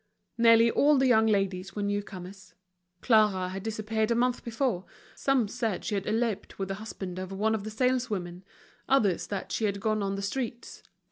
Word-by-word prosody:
Nearly 230 0 +6
all 290 +4 +4
the 265 - +3
young 220 -3 +4
ladies 195 -3 0
were 205 - -2
new 205 0 0
comers. 190 -2 -11 0.5
Clara 210 -6 +3
had 190 +1 -5
disappeared 220 +1 -2
a 235 - +2
month 250 +1 +1
before, 230 -5 -1 0.3
some 270 -5 +1
said 215 -1 -3
she - - -2
had 195 -1 -2
eloped 225 -1 -1
with 195 -1 -3
the - - -1
husband 190 -4 -6
of 185 0 -6
one 210 +3 0
of 215 -2 -2
the 215 - -5
saleswomen, 215 -7 -1 0.5
others 215 -10 +2
that 200 -2 -5
she 220 - 0
had 200 -1 -1
gone 215 +1 0
on 195 0 -1
the 200 - -4
streets. 240 +3 -4
215 Hz, 190 wpm, -28 LUFS, 195-230 Hz, 0.5 s, Nearly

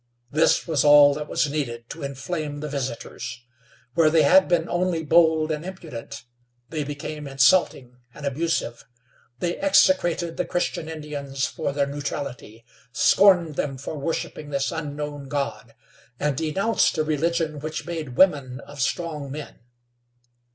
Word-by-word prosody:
This 155 +2 +3
was 155 -6 +1
all 145 -1 +8
that 150 +1 -5
was 150 - +1
needed 120 -6 -4
to 165 - -8
inflame 145 +2 -4
the 150 - -4
visitors. 120 -4 -5 0.5
Where 160 +1 +4
they 160 0 +4
had 190 +6 +6
been 170 -2 +1
only 175 -2 0
bold 160 0 +4
and 150 0 -3
impudent, 155 -8 -8 0.5
they 155 -2 -2
became 145 +1 -6
insulting 135 -3 +2
and 145 +3 -9
abusive. 140 -4 -1 0.5
They 175 +5 -2
execrated 175 - +3
the 180 - 0
Christian 170 -2 -2
Indians 145 -3 -4
for 160 -4 -3
their 140 0 +1
neutrality; 140 -5 -6 0.3
scorned 175 +2 +4
them 135 -2 -2
for 140 +4 -6
worshiping 150 0 -4
this 140 -1 -1
unknown 145 -2 -5
God, 125 -6 -4 0.4
and 150 -2 0
denounced 165 - +1
a 155 - +2
religion 155 0 -1
which 155 0 -5
made 160 -7 -5
women 140 -9 +3
of 145 -1 -9
strong 150 -2 -2
men. 145 +1 -8
150 Hz, 140 wpm, -24 LUFS, 140-165 Hz, 0.5 s, all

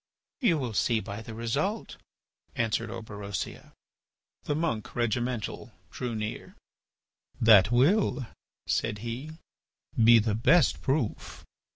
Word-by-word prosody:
"You 230 - +3
will 125 -6 -3
see 115 +2 +2
by 105 0 -6
the 110 0 -9
result," 140 - -2 0.6
answered 115 -1 -1
Orberosia. 105 -4 -6 0.7
The 145 - -1
monk 155 -9 -2
Regimental 120 -1 -2 0.2
drew 120 -2 -4
near: 110 0 -5 0.8
"That 110 -1 +6
will," 140 - +3 0.4
said 110 -2 -1
he, 130 +7 -5 0.7
"be 115 +1 +8
the 110 -1 +1
best 135 +11 +3
proof. 135 -5 -2
115 Hz, 105 wpm, -28 LUFS, 110-135 Hz, 0.8 s, be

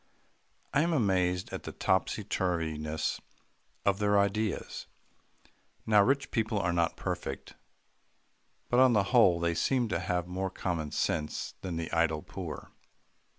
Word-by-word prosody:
I 145 - +4
am 170 +1 +1
amazed 90 - +1
at - - -4
the - - -7
topsy - - 0
turviness 80 -4 -1 0.7
of 100 0 +2
their 105 -1 +3
ideas. 100 0 -1 1.0
Now, 105 -2 +5
rich 135 +6 +1
people 110 -2 0
are 90 -3 0
not 85 -1 +1
perfect, - - -4 1.2
but 125 - +4
on 130 -1 +6
the 105 -3 +4
whole, 95 -8 +6
they 85 0 +1
seem 120 +7 +1
to - - 0
have 90 -2 -1
more 95 +1 -2
common 85 -5 -3
sense 75 +1 -2
than 90 -3 -4
the 80 0 -4
idle 80 -2 +1
poor. - - -7
95 Hz, 140 wpm, -30 LUFS, 85-110 Hz, 1.2 s, on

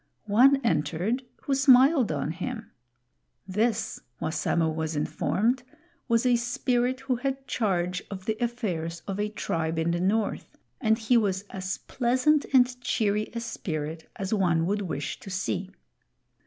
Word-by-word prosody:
One 255 +7 +5
entered 175 - 0 0.2
who 280 - 0
smiled 265 - +5
on 150 0 -1
him. 220 +7 -5 0.8
This, 215 +3 0 0.2
Wassamo 160 +1 0
was 160 0 -3
informed, 220 - 0 0.5
was 230 0 +2
a 245 -1 +4
Spirit 245 +1 0
who 265 -2 -1
had 270 +1 -3
charge 180 -7 0
of 190 -2 -7
the 220 - 0
affairs 180 -9 -3
of 195 0 -3
a 210 0 0
tribe 165 -6 -2
in 165 +1 +1
the 175 - 0
North, 210 +3 -1 0.2
and 220 -3 +3
he 235 +2 +3
was 195 -3 +1
as 190 0 -3
pleasant 260 +4 +1
and 250 -2 +4
cheery 215 -3 0
a - - -1
Spirit 160 -8 -5
as 195 +2 -3
one 175 -5 +2
would 205 +3 0
wish 155 -6 -4
to 195 - -10
see. 190 0 -2
210 Hz, 145 wpm, -27 LUFS, 175-245 Hz, 0.8 s, One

